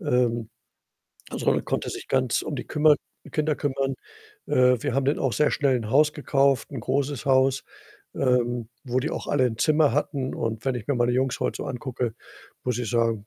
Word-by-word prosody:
Ähm, 120 - +1 0.8
also, - - -5
man - - +2
konnte - - -2
sich - - -7
ganz 130 -3 +1
um 145 - -4
die - - -5
kümmer 150 -1 +4 0.4
Kinder 155 -1 +1
kümmern. 135 -1 -1 0.5
Äh, 125 -2 +3
wir 145 -4 -1
haben 135 -1 +1
dann 140 +3 +1
auch 135 -3 +1
sehr 150 - +3
schnell 135 -3 +2
'n 110 -2 -4
Haus 150 +2 +4
gekauft, 140 -3 +1
'n - - -4
großes 140 -2 -1
Haus, 135 0 +3 0.5
ähm, 120 -3 +1 0.2
wo 125 0 0
die 145 - -2
auch - - -5
alle 135 -3 +2
'n 110 -2 -3
Zimmer 150 +1 +3
hatten 140 -2 -1
und 115 -1 -3
wenn 135 -2 0
ich 120 - -6
mir 140 - +2
meine 120 0 +2
Jungs 130 0 0
heute - - -1
so - - -4
angucke, 125 -2 -3 0.5
muss 125 -2 -1
ich 120 -3 -3
sagen, 115 -3 0
130 Hz, 200 wpm, -25 LUFS, 120-140 Hz, 0.8 s, kümmer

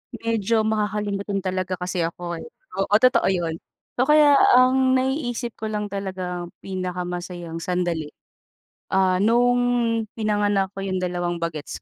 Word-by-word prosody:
Medyo 230 -1 0
makakalimutan 205 -2 -1
talaga 185 -1 -2
kasi 180 0 -4
ako, 170 0 -3
eh. - - -9 0.3
Oo, 195 - -1
totoo 250 +4 +4
yun. 170 -3 -1 0.4
So, 255 - +3
kaya, 300 -2 +6 0.2
ang 260 +1 +4
naiisip 255 -3 -1
ko 220 - -4
lang 210 -1 -3
talagang 185 -3 -4
pinakamasayang 180 -2 -5
sandali, 170 -3 -2 0.8
ah, 185 -1 +3
nung 240 +4 +3 0.6
pinanganak 205 -3 +1
ko 195 - -9
yung 185 -1 -2
dalawang 175 -1 -1
bagets 155 -3 -5
195 Hz, 125 wpm, -23 LUFS, 180-225 Hz, 0.8 s, kaya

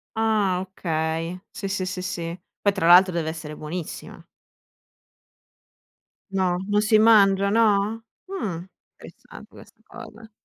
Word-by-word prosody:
Ah, 215 -5 +1
okay. 165 -2 -3
Sì, 195 -1 -6
sì, 190 -1 -2
sì, 185 0 -4
sì. 170 -1 -5 0.2
Poi 200 -1 +2
tra 190 -4 -2
l'altro 180 +1 +7
deve 160 -2 -2
essere 155 -2 -7
buonissima. 160 +2 -7 2.1
No, 185 -2 +1
non 210 0 +3
si 215 0 +4
mangia, 200 -3 +5
no? 220 +1 +1 0.2
Mh, 190 - -4 0.3
interessante - - -14
questa - - -17
cosa. 220 0 -13
190 Hz, 120 wpm, -23 LUFS, 170-210 Hz, 2.1 s, l'altro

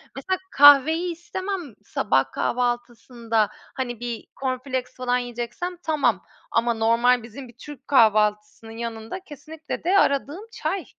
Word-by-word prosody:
Mesela, 375 +8 -2
kahveyi 290 +5 +6
istemem 345 - -5
sabah 135 -11 0
kahvaltısında. 235 - -1 0.3
Hani, 245 -3 -4
bir 240 -2 -5 0.2
corn 260 -1 0
flakes 255 -1 -4
falan 250 -1 0
yiyeceksem 245 +9 -5
tamam 275 - +1 0.3
ama 235 +1 +2
normal 230 +2 +3
bizim 245 +4 -10
bir 235 - -17
Türk 290 -3 -11
kahvaltısının 215 -3 +2
yanında 230 +6 -5
kesinlikle 310 -2 -8
de 370 +4 +3
aradığım 290 +9 0
çay. 380 -6 -3
250 Hz, 125 wpm, -24 LUFS, 230-295 Hz, 0.3 s, kahveyi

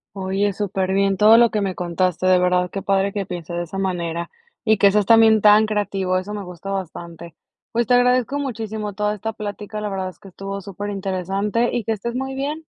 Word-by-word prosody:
Oye 195 +1 -1
súper 190 -1 -2
bien 195 -1 +2
todo 215 +2 +7
lo 235 -1 +5
que 215 - -1
me 190 -2 -1
contaste. 180 +1 -1
De 185 0 +5
verdad 180 0 +2
qué 195 - -5
padre 195 0 +1
que 200 -1 -3
piense 175 -2 -7
de 175 0 -2
esa 195 +3 -6
manera 170 -3 -2 0.3
y 220 0 +3
que 200 0 +5
seas 205 -1 +1
también 225 -2 +6
tan 210 +1 +6
creativo, 195 -3 -1
eso 205 +3 -6
me 205 - -5
gusta 180 +2 -9
bastante. 170 -3 -6 0.4
Pues, 235 -1 0
te 245 - +4
agradezco 250 +2 +2
muchísimo 220 -6 -4
toda 210 +1 -1
esta 220 +2 -4
plática, 210 0 -6
la 210 - -3
verdad 190 -1 -3
es - - -16
que - - -14
estuvo 195 +1 -6
súper 205 +2 -6
interesante 195 +4 -1
y 240 - -1
que 225 - -1
estés 235 +3 -4
muy 265 +1 -3
bien. 295 +4 -3
200 Hz, 215 wpm, -21 LUFS, 185-215 Hz, 0.4 s, todo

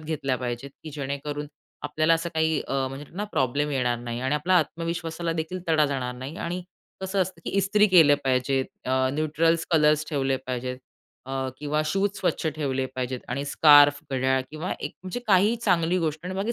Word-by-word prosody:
घेतल्या 150 -4 -2
पाहिजेत 125 +2 -4
की 155 - -6
जेणेकरून 145 +1 -4 0.4
आपल्याला 155 +2 +2
असं 165 +1 -2
काही 160 -1 +1
अ, - - -3 0.2
म्हणजे 135 +2 -8
ना 205 - -1
प्रॉब्लेम 140 +3 0
येणार 125 -3 0
नाही. 120 0 -5
आणि 130 +3 0
आपल्याला 180 +5 +3
आत्मविश्वासाला 165 +1 -3
देखील 165 +3 -4
तडा 155 -2 +4
जाणार 130 -3 -3
नाही. 130 +6 -7
आणि 180 +1 -4 0.4
कसं 190 +1 -1
असतं 180 -2 -7
की - - -3
इस्त्री 205 +2 +4
केले 165 -6 +7
पाहिजेत 130 +1 +1 0.2
अ, 130 0 +2
न्यूट्रल 155 +2 +2
कलर्स 155 -1 +4
ठेवले 135 -3 0
पाहिजेत. 125 0 -3 0.5
अ, 135 0 -2
किंवा 150 +1 -1
शूज 195 +5 +1
स्वच्छ 160 - -1
ठेवले 135 -4 -1
पाहिजेत 130 -1 -3
आणि 140 +3 -2
स्कार्फ, 145 0 +6
घड्याळ 130 0 +1
किंवा 155 +4 -4
एक - - -4
म्हणजे 190 +7 -5
काही 205 +4 +4
चांगली 180 -5 +1
गोष्ट. 155 -2 -2
आणि 185 - -4
बाकी 205 +5 -1
150 Hz, 180 wpm, -25 LUFS, 135-170 Hz, 0.5 s, केले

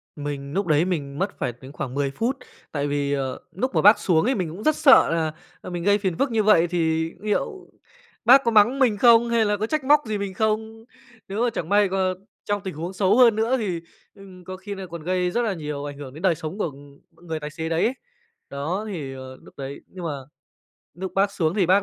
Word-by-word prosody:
Mình 145 -1 -5
núc 195 0 -1
đấy 155 +1 +3
mình 145 -6 -3
mất 195 +2 -2
phải 125 -3 -2
đến 130 +1 -10
khoảng 135 -3 -5
10 140 0 -1
phút. 235 - -1 0.3
Tại 145 -1 -1
vì, 145 0 -1
ờ, 135 -2 -2 0.2
núc 255 +8 -2
mà - - +4
bác 205 +1 +7
xuống 170 -4 +2
ấy, 260 +3 +2
mình 180 -6 -2
cũng 180 +7 -8
rất 310 +3 +3
sợ 285 - +6
là, 160 -1 0 0.3
ờ, - - -8
mình 175 -1 -4
gây 205 +2 +4
phiền 190 -5 -2
phức 275 -3 0
như 220 -1 +2
vậy 200 -5 +5
thì 160 -1 0
niệu 215 - -3 0.6
bác 265 +4 +7
có 235 - +1
mắng 225 +5 +4
mình 240 -6 +3
không 235 +1 +6
hay 230 -1 +3
là 205 0 +1
có 215 +2 -2
trách 305 +2 -1
móc 295 +2 +6
gì 215 -1 -2
mình 200 -1 -4
không. 220 +2 -1 0.4
Nếu 205 +4 -2
mà 245 - +2
chẳng 165 - -4
may 205 0 +4
g 190 - -3 0.5
trong 205 0 -1
tình 190 -2 -5
huống 170 +5 -5
xấu 190 +3 +2
hơn 240 -4 +6
nữa 230 +4 +1
thì, 185 -8 -3 0.3
ừm, 190 -2 -14
có 185 +1 -7
khi 200 +2 -7
nà 195 -1 -7
còn 170 -2 -8
gây 180 +1 0
rất 240 - 0
là 225 -4 0
nhiều 150 -4 -5
ảnh 145 -1 -7
hưởng 140 -3 -9
đến 155 - -10
đời 185 -4 +3
sống 160 +3 -6
của, 210 - 0
ừm, 140 -1 -10 0.3
người 160 -1 -3
tài 150 0 -6
xế 160 +1 -5
đấy 165 +1 +1
ấy. 240 - +1 0.6
Đó, 160 +9 -3
thì, 150 -9 -5
ờ, 130 0 -9
lúc - - -16
đấy 135 +1 -7
nhưng 180 -2 -9
mà 165 - -1 0.8
núc 190 +2 -6
bác 195 +1 +2
xuống 165 -4 0
thì 195 -4 +2
bác 190 +3 +4
185 Hz, 245 wpm, -24 LUFS, 155-215 Hz, 0.8 s, bác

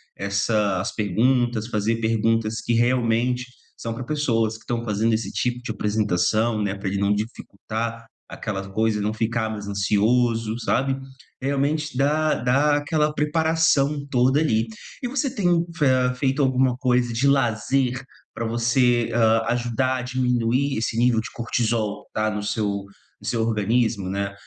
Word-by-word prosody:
essa 100 0 0
as - - -4
perguntas, 115 +2 +1
fazer 115 +1 -1
perguntas 115 0 +1
que 120 - -1
realmente 125 +1 +1 0.3
são 115 - -4
pra 130 - -5
pessoas 120 -6 0
que - - -11
estão 120 0 -3
fazendo 110 +1 +1
esse 110 +1 -1
tipo 125 0 -1
de 120 - -4
apresentação, 110 +1 +1
né, 100 -1 -1
pra 100 0 -5
ele 100 +1 -1
não 100 +1 +2
dificultar, 115 +1 -5 0.2
aquelas 95 -3 -5
coisas, 110 +1 0
não 105 +1 -1
ficar 110 0 -1
mais 105 -2 -6
ansioso, 110 +3 +1
sabe? 135 +2 0 0.4
Realmente 140 +1 -1
dá 150 +3 +2
dá 135 +5 +2
aquela 150 +1 0
preparação 150 -2 +1
toda 130 +2 +3
ali. 115 -7 +1 0.4
E - - 0
você 275 +1 0
tem 210 -8 -1 0.3
fe 150 -3 +1 0.3
feito 135 +2 0
alguma 130 -1 +2
coisa 125 -1 +1
de 120 +5 +1
lazer 130 0 +1 0.3
pra 115 - -4
você, 120 +1 +2
hã, 115 -1 +4
ajudar 120 +2 0
a - - -3
diminuir 125 +1 0
esse 115 0 -2
nível 120 -1 +3
de 110 - -5
cortisol, 115 -3 -1
tá, 110 0 0
no 105 0 -3
seu 100 -2 -2 0.3
no 105 - -10
seu 115 -2 0
organismo, 110 -2 0
né? 100 0 -2
115 Hz, 150 wpm, -23 LUFS, 110-130 Hz, 0.4 s, hã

